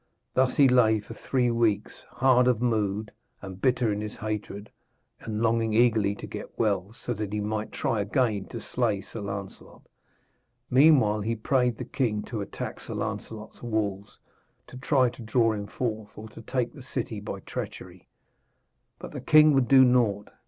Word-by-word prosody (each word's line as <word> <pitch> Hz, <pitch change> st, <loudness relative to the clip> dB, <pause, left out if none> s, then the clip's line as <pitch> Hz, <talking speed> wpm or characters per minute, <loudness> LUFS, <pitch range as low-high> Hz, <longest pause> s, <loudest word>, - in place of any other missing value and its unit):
Thus 130 Hz, 0 st, +2 dB
he 140 Hz, -, +7 dB
lay 115 Hz, -4 st, +4 dB
for 105 Hz, -, -10 dB
three 125 Hz, -2 st, 0 dB
weeks, 110 Hz, -3 st, 0 dB
hard 125 Hz, -1 st, +3 dB
of 125 Hz, -4 st, +2 dB
mood 110 Hz, -3 st, -1 dB, 0.3 s
and 95 Hz, -1 st, -9 dB
bitter 125 Hz, -4 st, +2 dB
in 105 Hz, -, -3 dB
his 105 Hz, 0 st, -6 dB
hatred, 105 Hz, -1 st, -5 dB, 0.5 s
and 110 Hz, 0 st, -4 dB
longing 115 Hz, -1 st, +1 dB
eagerly 110 Hz, -4 st, +3 dB
to -, -, -8 dB
get -, -, -8 dB
well, 100 Hz, -3 st, 0 dB
so 120 Hz, +1 st, -5 dB
he 105 Hz, -1 st, -3 dB
might 105 Hz, +1 st, -3 dB
try 110 Hz, -3 st, -1 dB
again 105 Hz, -1 st, 0 dB
to -, -, -7 dB
slay 100 Hz, -2 st, -1 dB
Sir 110 Hz, +3 st, -9 dB
Lancelot. 100 Hz, -1 st, -8 dB, 0.9 s
Meanwhile 130 Hz, -6 st, +5 dB
he 115 Hz, +3 st, -1 dB
prayed 125 Hz, +1 st, +1 dB
the 125 Hz, -, -5 dB
king 110 Hz, -5 st, -1 dB
to 110 Hz, -3 st, -5 dB
attack 100 Hz, -, -6 dB
Sir -, -, -7 dB
Lancelot's 110 Hz, -1 st, -6 dB
walls, 105 Hz, -4 st, -3 dB, 0.5 s
to -, -, -14 dB
try 130 Hz, 0 st, +2 dB
to 120 Hz, -, -13 dB
draw 115 Hz, 0 st, +2 dB
him 100 Hz, -1 st, -5 dB
forth, 110 Hz, -2 st, -4 dB
or 110 Hz, +1 st, -9 dB
to 115 Hz, -, -12 dB
take 125 Hz, +1 st, -2 dB
the 140 Hz, -, -11 dB
city 120 Hz, -4 st, -4 dB
by 100 Hz, -1 st, -6 dB
treachery. -, -, -8 dB, 0.9 s
But -, -, -9 dB
the -, -, -6 dB
king 155 Hz, 0 st, +6 dB
would 135 Hz, -3 st, +3 dB
do 130 Hz, +1 st, +7 dB
naught. 115 Hz, -5 st, +2 dB
110 Hz, 170 wpm, -27 LUFS, 105-125 Hz, 0.9 s, he